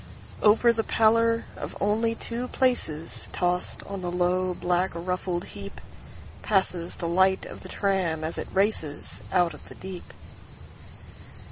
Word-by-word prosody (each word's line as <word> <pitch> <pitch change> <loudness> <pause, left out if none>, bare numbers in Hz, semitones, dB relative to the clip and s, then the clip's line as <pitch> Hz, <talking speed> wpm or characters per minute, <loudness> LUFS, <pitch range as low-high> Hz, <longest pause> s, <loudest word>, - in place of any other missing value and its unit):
Over 225 +3 +6
the 225 -1 0
pallor 230 +1 +3
of - - -6
only 225 +3 +2
two 240 +2 -4
placesTossed 180 - -1
on 195 -1 -4
the 175 - -2
low, 180 +1 +1
black, 180 +2 +1
ruffled 180 +1 -2
heapPasses 195 -2 -3
the 170 - -3
light 190 +2 +3
of - - -8
the - - -10
tram 185 -5 0
as 160 +1 -3
it - - -4
racesOut 180 -2 0
of - - -9
the - - -9
deep. 185 -1 -8
190 Hz, 125 wpm, -27 LUFS, 175-215 Hz, -, Over